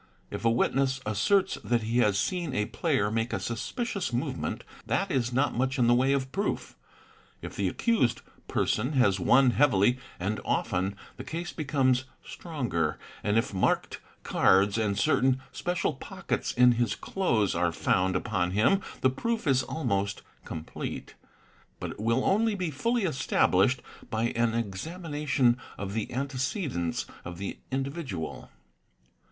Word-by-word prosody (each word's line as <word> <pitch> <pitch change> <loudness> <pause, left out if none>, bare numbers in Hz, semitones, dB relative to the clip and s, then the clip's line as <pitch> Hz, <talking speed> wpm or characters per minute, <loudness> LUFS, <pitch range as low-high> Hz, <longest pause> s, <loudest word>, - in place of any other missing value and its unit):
If - - -5
a 115 - +4
witness 135 +3 +1
asserts 185 - +2
that 120 -2 +1
he 115 +3 +1
has 105 -4 +3
seen 170 - -1
a 105 - +1
player 105 0 0
make 115 +2 -1
a - - 0
suspicious 200 - -3
movement, 120 +1 -2 0.2
that - - 0
is 125 -2 +1
not 135 +4 +1
much 130 +3 0
in 125 - +3
the 120 - +5
way 130 +3 +3
of 135 -1 0
proof. 200 +6 -2 0.7
If - - -7
the - - 0
accused 205 - +1 0.3
person 125 +8 0
has 100 -8 +3
won 130 +7 +5
heavily 125 -2 +3 0.2
and 100 +4 -2
often, 95 +2 0 0.2
the - - -6
case 170 +2 -5
becomes 135 -4 +1 0.2
stronger, 120 - -2 0.3
and 105 +2 +2
if 115 -1 0
marked 95 - 0 0.2
cards 100 +1 +4
and 105 -3 0
certain 130 +5 +3
special 175 -2 -1
pockets 135 - -3
in 125 0 +6
his 120 -3 +1
clothes 115 - 0
are 85 0 +1
found 90 +2 +1
upon 90 -1 0
him 110 - +3 0.2
the 130 - +5
proof 230 - -2
is 135 -3 +3
almost 100 -9 -2 0.2
complete; 80 0 -6 0.7
but - - -4
it - - -10
will 115 +4 +1
only 215 +2 +3
be 180 -5 -2
fully 230 - 0
established 125 - +2 0.3
by 110 +1 0
an 115 -1 +1
examination 135 - 0 0.2
of 100 -1 -4
the 110 -1 -3
antecedents 135 - -2 0.2
of 85 0 -7
the 100 +1 -5
indi 135 +1 -1
vidual. 130 - -6
125 Hz, 150 wpm, -28 LUFS, 105-145 Hz, 0.7 s, in